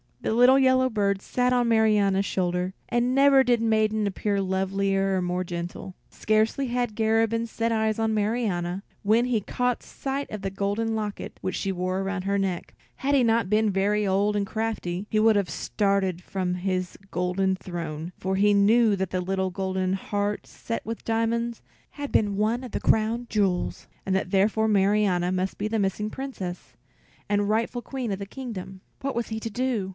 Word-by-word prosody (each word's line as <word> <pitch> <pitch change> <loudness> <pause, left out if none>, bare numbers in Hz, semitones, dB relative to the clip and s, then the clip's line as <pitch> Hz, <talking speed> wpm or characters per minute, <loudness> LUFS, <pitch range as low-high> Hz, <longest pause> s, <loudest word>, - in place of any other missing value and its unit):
The - - -1
little 250 +3 +6
yellow 260 -1 +4
bird 200 -4 0
sat 250 +3 0
on 245 -1 +2
Marianna's 210 -3 +3
shoulder, 180 0 -1 0.2
and 240 +1 +1
never 275 -1 +6
did 245 -2 +2
maiden 220 -1 +2
appear 200 +1 -1
lovelier 195 0 0
or - - 0
more 180 +1 -1
gentle. 175 +1 -6
Scarcely 220 +5 +1
had 240 -3 -1
Garabin 225 +1 +1
set 230 +1 -1
eyes 220 -1 +1
on 225 -1 +1
Marianna, 205 -4 -1 0.2
when 220 +4 +3
he 240 -4 +1
caught 250 +4 -1
sight 275 +1 -4
of 215 - -5
the 195 -1 -3
golden 205 +3 -1
locket 210 -2 -5
which 185 - -2
she 195 - -1
wore 185 +1 -2
about 195 -1 -3
her 200 +1 0
neck. 190 -3 -2 0.2
Had 280 +2 +1
he 265 - +4
not 225 -4 +2
been 215 0 +3
very 205 +2 +1
old 200 +2 +2
and 205 -1 +1
crafty, 210 -4 -3
he 215 - +1
would 220 0 +5
have 200 -3 +1
started 195 -4 0
from 185 -1 -2
his 185 0 -2
golden 185 +1 0
throne, 170 -3 -6
for 190 +1 -1
he 205 +2 +4
knew 215 +2 +4
that 190 0 -2
the 185 - -1
little 190 +1 -1
golden 190 0 -1
heart 205 +1 -2
set 230 - -5
with 225 0 -5
diamonds 230 +1 0 0.3
had 285 -1 -6
been 205 -2 +2
one 225 +4 +1
of 250 - -8
the - - -2
crown 225 +2 +2
jewels, 195 -4 0 0.2
and 190 - 0
that 190 -1 -1
therefore 210 +3 +3
Marianna 195 -3 +2
must 185 +1 -1
be 210 - -2
the 220 0 -1
missing 200 +2 -1
Princess, 205 -10 -6 0.5
and 205 0 +1
rightful 230 +3 0
queen 255 -3 -4
of 195 - -3
the 200 - -4
kingdom. 195 -6 -7 0.2
What 275 0 -2
was 235 0 -1
he 220 0 -3
to 225 - -4
do? 235 -4 -1
205 Hz, 185 wpm, -26 LUFS, 190-225 Hz, 0.5 s, little